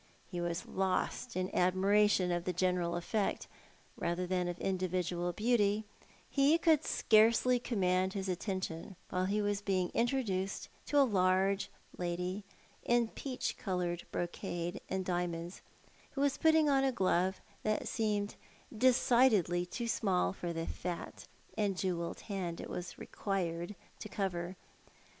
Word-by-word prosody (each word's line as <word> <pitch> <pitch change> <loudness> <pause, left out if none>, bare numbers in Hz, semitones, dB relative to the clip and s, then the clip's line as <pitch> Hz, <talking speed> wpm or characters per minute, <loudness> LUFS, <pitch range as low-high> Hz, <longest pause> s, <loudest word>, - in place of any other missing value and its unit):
He 175 -2 -3
was 170 +1 -2
lost 190 -2 -1
in 185 0 -1
admira 195 +3 +4
tion 180 -3 +2
of 175 0 -1
the 180 - 0
general 180 -1 +1
effect, 195 +4 -1 0.5
rather 175 +1 -1
than 180 0 0
of 175 0 -3
individual 180 -2 -1
beauty 215 0 +2 0.2
• - - -24 0.2
he 285 +3 +4
could 320 -3 +4
scarcely 230 +3 +4
command 190 -5 +1
his 195 -1 -3
attention 185 -1 -3 0.2
while 185 0 +1
he 205 +2 +1
was 205 0 0
being 190 -3 0
intro 250 +3 +1
duced 190 -2 -2 0.2
to 290 - +1
a 285 - +8
large 190 -2 +2 0.3
lady 180 +3 -2 0.4
in 240 -1 +2
peach 260 +1 -4
coloured 175 -3 -2
brocade 175 +1 -3
and 190 -1 -1
diamonds 175 -1 -2 0.5
who 275 - -2
was 280 -1 +3
putting 320 -1 +4
on 275 -2 +4
a 270 - +3
glove 185 -3 +1 0.2
which 215 0 0
seemed 210 -2 -1 0.4
decidedly 225 -7 +4
too 235 +6 -4
small 195 -6 +1
for 175 -3 -4
the 165 0 -3
fat 175 0 -5 0.3
and 200 -3 0
jewelled 175 -3 -2
hand 185 -5 -4
it - - -7
was 180 - -5
required 175 -1 -3 0.2
to 215 - -7
cover. 185 -3 -2
190 Hz, 145 wpm, -33 LUFS, 180-215 Hz, 0.5 s, a